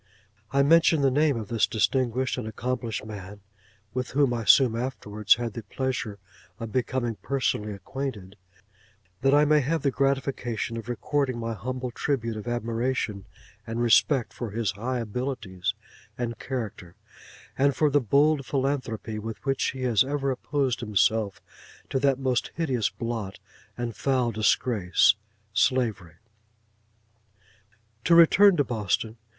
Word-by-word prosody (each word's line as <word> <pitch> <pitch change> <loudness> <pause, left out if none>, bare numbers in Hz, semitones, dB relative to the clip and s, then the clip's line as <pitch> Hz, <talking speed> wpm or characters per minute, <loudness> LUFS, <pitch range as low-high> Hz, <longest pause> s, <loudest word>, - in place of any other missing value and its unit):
I 140 0 +3
mention 165 +1 +5
the 135 -1 +3
name 145 -1 +2
of 110 -2 -6
this 115 -3 +2
distinguished 130 +2 0
and 115 - -5
accomplished 115 0 -3
man 100 -1 -9 0.5
(with 125 -1 -2
whom 135 -3 +3
I 115 -2 -3
soon 115 +3 +6
afterwards 110 -4 +1
had 120 -2 -4
the 115 - -5
pleasure 115 -1 -3 0.4
of 115 -2 -6
becoming 120 -2 -1
personally 110 -6 -1
acquainted), 105 -3 -6 0.9
that 135 +2 +4
I 150 +1 +5
may 150 0 +4
have 150 +3 -1
the 140 - +2
gratification 130 -3 -1
of 115 0 -6
recording 130 +1 -1
my 115 0 -3
humble 125 +4 -4
tribute 115 -3 -2
of 110 +1 -7
admiration 115 -3 -2 0.4
and 115 +1 -3
respect 120 +2 +3
for 120 - -5
his 110 -1 -1
high 120 +7 -3
abilities 110 -5 -3 0.4
and 120 -1 -3
character; 105 -9 -5 0.6
and 140 +1 +2
for 150 -2 +2
the 145 +1 +3
bold 140 +5 +3
philanthropy 130 -6 -2
with 110 -1 -6
which 135 -1 +1
he 130 -1 -5
has 115 -5 +4
ever 140 0 -1
opposed 130 -1 -1
himself 105 -2 +1 0.5
to 135 - +1
that 135 -1 +2
most 130 -2 0
hideous 130 -10 0
blot 115 -5 -5 0.4
and 120 -2 -4
foul 130 0 +1
disgrace—Slavery. 105 - +1 1.9
To 170 - +5
return 185 +3 +7
to 145 - +4
Boston. 110 -1 -2
120 Hz, 135 wpm, -26 LUFS, 110-135 Hz, 1.9 s, return